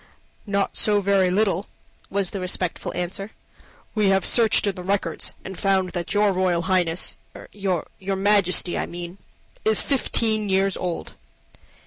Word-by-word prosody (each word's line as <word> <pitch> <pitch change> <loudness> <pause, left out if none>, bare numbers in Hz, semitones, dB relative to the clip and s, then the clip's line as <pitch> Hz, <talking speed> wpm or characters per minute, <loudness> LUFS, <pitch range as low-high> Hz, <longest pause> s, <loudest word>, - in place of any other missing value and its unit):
"Not 200 -1 0
so 210 -1 +3
very 195 -2 +2
little," 195 0 +1 0.4
was 195 -2 -1
the 200 - -4
respectful 180 -1 -3
answer. 190 +4 -4 0.6
"We 215 -2 +2
have 195 0 +2
searched 230 -3 +4
in 200 - +1
the 180 - -8
records, 185 -3 -1
and 190 -1 -7
found 190 -2 +1
that 175 -2 -4
your 205 0 +3
Royal 180 -2 +1
Highness 180 -2 +1 0.3
your 190 -5 -1 0.2
Majesty, 195 -2 +2
I - - -2
mean 175 +2 -8 0.4
is 220 -1 +4
fifteen 220 -6 +1
years 195 0 +2
old." 175 -2 -4
195 Hz, 140 wpm, -23 LUFS, 180-200 Hz, 0.6 s, searched